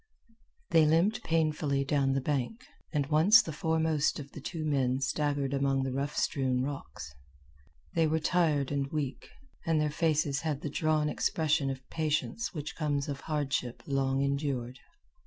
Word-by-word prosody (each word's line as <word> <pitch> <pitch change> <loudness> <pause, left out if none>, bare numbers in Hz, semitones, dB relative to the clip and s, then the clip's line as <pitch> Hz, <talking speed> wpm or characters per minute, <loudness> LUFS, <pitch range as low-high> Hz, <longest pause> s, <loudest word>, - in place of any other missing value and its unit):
They 160 -2 +6
limped 185 +9 +3
painfully 155 -4 +1
down 135 -1 +1
the 135 - 0
bank, 145 - -2 0.3
and 145 -3 0
once 160 +10 +6
the 160 - -5
foremost 160 -2 +1
of 140 -1 -8
the 150 - -9
two 155 +2 -4
men 130 -3 +1
staggered 140 -1 -1
among 135 -1 +1
the 135 - -2
rough 140 +3 -3
strewn 130 -2 +1
rocks. 135 - -6 0.8
They 165 -1 +3
were 155 +1 +1
tired 155 -5 +1
and 140 -1 -1
weak, 145 -4 -3 0.3
and 165 -1 +1
their 150 -1 +1
faces 155 -3 +1
had 150 -3 -2
the 150 - -4
drawn 155 0 +1
expression 150 -2 +1
of 130 0 -6
patience 155 +8 -1
which 150 -4 -6
comes 145 -3 -1
of 140 -1 -4
hardship 140 -5 -2
long 135 -1 0
endured. 140 -3 -2
145 Hz, 155 wpm, -30 LUFS, 135-155 Hz, 0.8 s, They